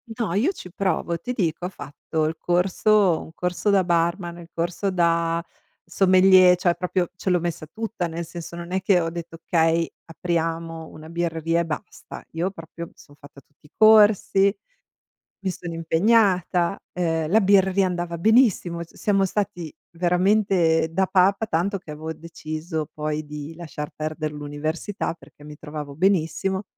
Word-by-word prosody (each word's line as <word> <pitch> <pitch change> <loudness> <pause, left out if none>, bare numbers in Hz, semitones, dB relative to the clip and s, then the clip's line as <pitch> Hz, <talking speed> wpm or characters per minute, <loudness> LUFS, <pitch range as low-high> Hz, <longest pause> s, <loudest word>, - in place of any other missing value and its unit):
No, 220 -8 -2
io 250 - +2
ci 180 - -11
provo. 170 -3 -1
Ti 250 +1 -4
dico, 175 -5 -1
ho - - -2
fatto 155 -2 -4
il 160 +1 -1
corso 185 +1 +2
un 160 - -11
corso 180 +4 -1
da 195 -2 +4
barman, 170 0 0
il 170 0 -12
corso 175 +4 -2
da 170 -2 +1 0.4
sommelier, 185 0 +6
cioè 175 -1 +1
proprio 180 0 -1
ce 185 - -3
l'ho 180 -1 +3
messa 165 -2 -4
tutta, 220 -1 -4
nel 165 +1 -5
senso 170 0 -8
non 170 +1 -8
è 190 0 0
che 190 -1 +3
ho 165 -1 -1
detto: 170 -1 -7
"Okay, 165 0 +2 0.2
apriamo 165 -1 -3
una 155 +1 -12
birreria 165 -1 -1
e - - -2
basta." 165 +4 -7
Io 170 +4 -1
proprio 170 -1 -9
mi - - -22
sono 145 0 -18
fatta 140 -1 -14
tutti 150 +1 -25
i - - -31
corsi, 210 -2 +5 0.8
mi 190 - -2
sono 175 -1 -7
impegnata, 180 +1 +2
uhm, 165 -3 -1
la 220 +4 +5
birreria 195 0 +4
andava 175 -2 -3
benissimo. 200 -5 +3
C 170 - -18
siamo 195 -2 +2
stati 180 -5 -3 0.2
veramente 180 -2 +2
da 190 +3 +2
papa, 195 +3 +3
tanto 195 +2 0
che 165 -5 -11
avevo 160 +2 -5
deciso 155 0 -5
poi 155 0 -3
di 150 +1 -7
lasciar 155 -3 -7
perder 155 0 -3
l'università 150 +7 -4
perché 150 -3 -18
mi 150 0 -10
trovavo 150 -2 -7
benissimo. 190 +2 +1
170 Hz, 160 wpm, -23 LUFS, 160-190 Hz, 0.8 s, sommelier